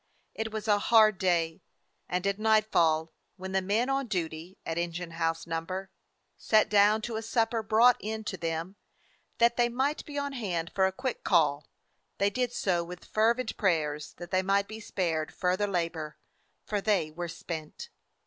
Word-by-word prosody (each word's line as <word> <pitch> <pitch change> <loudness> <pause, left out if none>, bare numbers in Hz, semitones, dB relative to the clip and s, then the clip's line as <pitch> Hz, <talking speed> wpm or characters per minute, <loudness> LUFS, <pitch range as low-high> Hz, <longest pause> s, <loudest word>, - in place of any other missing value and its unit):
It 220 0 -4
was 215 0 -5
a 205 -1 +4
hard 215 -3 +5
day, 170 -3 +1 0.5
and 180 +1 -1
at 200 +1 0
nightfall, 175 -8 +2 0.2
when 190 0 -6
the 190 0 +1
men 210 +6 +1
on 270 -1 0
duty 170 -2 -4
at 165 +1 -2
Engine 170 0 -3
House 165 0 -1
No. 165 -1 -2 0.5
— - - -48 0.2
sat 215 -1 +3
down 210 +1 +4
to 230 -1 -3
a - - -3
supper 225 0 0
brought 225 +3 +5
in 220 +1 -4
to 205 - -4
them, 165 +2 -4 0.6
that 235 0 +3
they 240 -1 +3
might 265 +5 -1
be 290 -1 -7
on 285 0 -2
hand 180 -9 -3
for 190 -1 +3
a - - -2
quick 250 +6 -4
call, 150 -5 +2 0.5
they 200 0 +2
did 250 +2 -1
so 180 -7 0
with 180 +1 -9
fervent 230 +2 +1
prayers 155 -7 0
that 175 0 -9
they 185 0 +3
might 200 +1 +1
be 220 0 -8
spared 165 -7 -2
fur 180 0 0
ther 205 +2 0
labor, 165 -5 -3 0.5
for 205 -2 -1
they 195 -7 +1
were 175 +2 -5
spent. 160 -2 -7
195 Hz, 180 wpm, -29 LUFS, 170-220 Hz, 0.6 s, hard